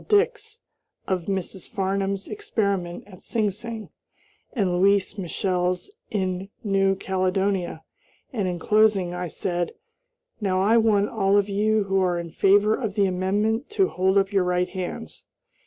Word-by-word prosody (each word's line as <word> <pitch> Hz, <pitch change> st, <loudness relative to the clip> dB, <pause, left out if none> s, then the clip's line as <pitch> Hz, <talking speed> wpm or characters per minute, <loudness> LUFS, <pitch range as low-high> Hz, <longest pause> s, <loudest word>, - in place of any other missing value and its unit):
Dix, 430 Hz, +1 st, +1 dB, 0.5 s
of 185 Hz, -3 st, -1 dB
Mrs. 190 Hz, -1 st, -3 dB
Farnham's 195 Hz, 0 st, -1 dB
experiment 200 Hz, -, -2 dB
at 185 Hz, -3 st, -14 dB
Sing 215 Hz, -4 st, 0 dB
Sing, 220 Hz, +2 st, -7 dB, 0.6 s
and 200 Hz, -7 st, 0 dB
Louise 195 Hz, +2 st, +3 dB
Michel's 180 Hz, -, -1 dB, 0.2 s
in 190 Hz, -1 st, -2 dB
New 195 Hz, -2 st, +2 dB
Caledonia, 190 Hz, -2 st, -1 dB, 0.5 s
and, 205 Hz, -6 st, -1 dB
in 180 Hz, -1 st, -2 dB
closing, 210 Hz, -1 st, +3 dB
I 180 Hz, 0 st, -3 dB
said: 175 Hz, +1 st, -2 dB, 0.7 s
"Now 190 Hz, -3 st, 0 dB
I 205 Hz, +4 st, +4 dB
want 215 Hz, -3 st, +3 dB
all 200 Hz, -2 st, +2 dB
of 205 Hz, 0 st, +2 dB
you 215 Hz, +1 st, +2 dB
who 195 Hz, -1 st, +1 dB
are 180 Hz, -2 st, +1 dB
in 170 Hz, -1 st, -5 dB
favor 205 Hz, +5 st, +4 dB
of 220 Hz, -4 st, -2 dB
the 200 Hz, -, +3 dB
amendment 205 Hz, -, 0 dB
to 385 Hz, -, +4 dB
hold 190 Hz, +2 st, +1 dB
up 195 Hz, +1 st, +2 dB
your 195 Hz, -2 st, +3 dB
right 180 Hz, 0 st, +1 dB
hands." 180 Hz, -, -6 dB
195 Hz, 145 wpm, -24 LUFS, 185-210 Hz, 0.7 s, I